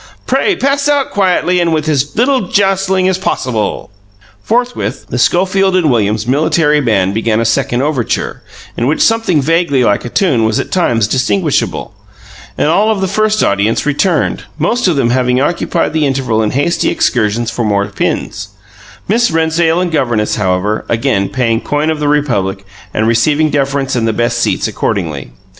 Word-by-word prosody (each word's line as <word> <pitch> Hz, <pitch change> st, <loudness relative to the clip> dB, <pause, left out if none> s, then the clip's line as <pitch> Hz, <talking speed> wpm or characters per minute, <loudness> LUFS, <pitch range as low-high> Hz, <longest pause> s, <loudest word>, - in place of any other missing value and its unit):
Pray 395 Hz, -, +1 dB
pass 280 Hz, -1 st, 0 dB
out 285 Hz, -2 st, +1 dB
quietly 180 Hz, -2 st, +1 dB
and 170 Hz, -1 st, +1 dB
with 155 Hz, -1 st, -1 dB
as 145 Hz, -2 st, 0 dB
little 250 Hz, -4 st, +1 dB
jostling 190 Hz, -1 st, +1 dB
as 190 Hz, 0 st, 0 dB
possible." 120 Hz, -, -2 dB, 0.5 s
Forthwith, 245 Hz, -, -2 dB
the -, -, -3 dB
Schofield 190 Hz, +1 st, +2 dB
and 165 Hz, -6 st, +2 dB
Williams 110 Hz, -2 st, 0 dB
Military 150 Hz, +3 st, +2 dB
Band 100 Hz, -7 st, +1 dB
began 110 Hz, 0 st, 0 dB
a 115 Hz, -, 0 dB
second 120 Hz, +2 st, 0 dB
overture, 140 Hz, -6 st, -2 dB, 0.3 s
in 120 Hz, -, -1 dB
which 150 Hz, -, 0 dB
something 225 Hz, -10 st, +2 dB
vaguely 165 Hz, -4 st, +1 dB
like 105 Hz, -3 st, +1 dB
a 120 Hz, -, -5 dB
tune 135 Hz, -, +1 dB
was 110 Hz, 0 st, +1 dB
at -, -, -4 dB
times 120 Hz, -, +1 dB
distinguishable; 140 Hz, -, -1 dB, 0.6 s
and -, -, +1 dB
all 205 Hz, +7 st, +2 dB
of 215 Hz, -3 st, 0 dB
the 190 Hz, -, 0 dB
first 215 Hz, +2 st, +1 dB
audience 105 Hz, +6 st, 0 dB
returned, 150 Hz, +2 st, 0 dB
most 230 Hz, +9 st, 0 dB
of 175 Hz, -, +2 dB
them 120 Hz, -4 st, +1 dB
having 125 Hz, 0 st, +1 dB
occupied 165 Hz, +2 st, -1 dB
the 155 Hz, -2 st, +1 dB
interval 130 Hz, -5 st, 0 dB
in 110 Hz, -, 0 dB
hasty 145 Hz, +8 st, 0 dB
excursions 115 Hz, 0 st, 0 dB
for 120 Hz, -, -3 dB
more 100 Hz, -2 st, +1 dB
pins; 100 Hz, 0 st, -3 dB, 0.6 s
Miss 235 Hz, +4 st, +2 dB
Rennsdale 160 Hz, +1 st, +1 dB
and 180 Hz, -2 st, -2 dB
governess, 120 Hz, -8 st, 0 dB
however, 100 Hz, +1 st, -1 dB
again 115 Hz, -5 st, 0 dB
paying 115 Hz, -3 st, 0 dB
coin 150 Hz, +2 st, -1 dB
of 155 Hz, -, -3 dB
the 150 Hz, -, -1 dB
Republic 105 Hz, -10 st, 0 dB, 0.3 s
and 110 Hz, +1 st, 0 dB
receiving 145 Hz, +7 st, +2 dB
deference 140 Hz, -1 st, -1 dB
and 115 Hz, -2 st, 0 dB
the 110 Hz, -, 0 dB
best 120 Hz, +1 st, -1 dB
seats -, -, 0 dB
accordingly. 80 Hz, -10 st, -3 dB
145 Hz, 170 wpm, -13 LUFS, 115-180 Hz, 0.6 s, Schofield